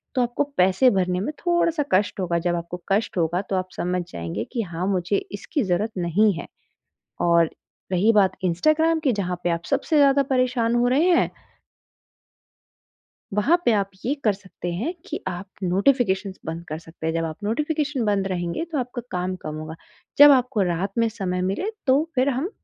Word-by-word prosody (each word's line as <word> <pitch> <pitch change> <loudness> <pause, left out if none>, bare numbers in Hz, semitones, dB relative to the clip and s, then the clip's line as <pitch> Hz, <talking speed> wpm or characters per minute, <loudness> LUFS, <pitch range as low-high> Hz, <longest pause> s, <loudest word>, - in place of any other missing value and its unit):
तो 255 - +3
आपको 245 +4 0
पैसे 190 +8 +5
भरने 180 -1 +1
में 260 +10 -3
थोड़ा-सा 340 -3 +1
कष्ट 195 +1 +2
होगा, 170 -2 0
जब 175 +1 0
आपको 170 +1 -5
कष्ट 200 -1 0
होगा, 170 +2 +1
तो 195 -1 -4
आप 185 0 -2
समझ 180 +1 -1
जाएँगे 85 +6 -4
कि 235 - 0
हाँ, 175 -1 -4
मुझे 190 0 0 0.2
इसकी 290 +4 -2
ज़रूरत 200 +4 0
नहीं 185 +5 +3
है। - - -7 0.8
और 170 -1 +4 0.4
रही 205 +6 +4
बात 200 -3 +3
इंस्टाग्राम 310 - +2
की, 275 -5 +2
जहाँ 180 -4 -3
पे 175 - +2
आप 170 0 -2
सबसे 315 - +1
ज़्यादा 280 -1 +5
परेशान 245 -2 +1
हो 240 +1 +3
रहे 295 +8 +3
हैं 345 - +3 2.0
वहाँ 305 - +3
पे 235 - +5
आप 200 -2 +1 0.2
ये 270 - +1
कर 210 -3 +3
सकते 185 -2 -7
हैं 255 - -2
कि - - -4
आप 180 +1 -4 0.2
नोटिफ़िकेशंस 195 0 +1
बंद 165 +1 -5
कर 155 - -3
सकते 160 -1 -8
हैं, 160 - 0
जब 165 0 -1
आप 160 -1 -5
नोटिफ़िकेशन 295 +3 -1
बंद 200 -2 +1
रहेंगे, 175 - -2
तो 330 -3 -4
आपका 250 -1 -3
काम 180 +1 -2
कम 155 0 -5
होगा, 155 +1 -7 0.4
जब 290 0 +10
आपको 250 -5 +2
रात 180 +2 -1
में 230 0 +3
समय 185 -4 -3
मिले, 195 - -1 0.2
तो 290 +5 +3
फिर 260 +2 +3
हम 275 +8 -1
200 Hz, 185 wpm, -23 LUFS, 180-260 Hz, 2.0 s, जब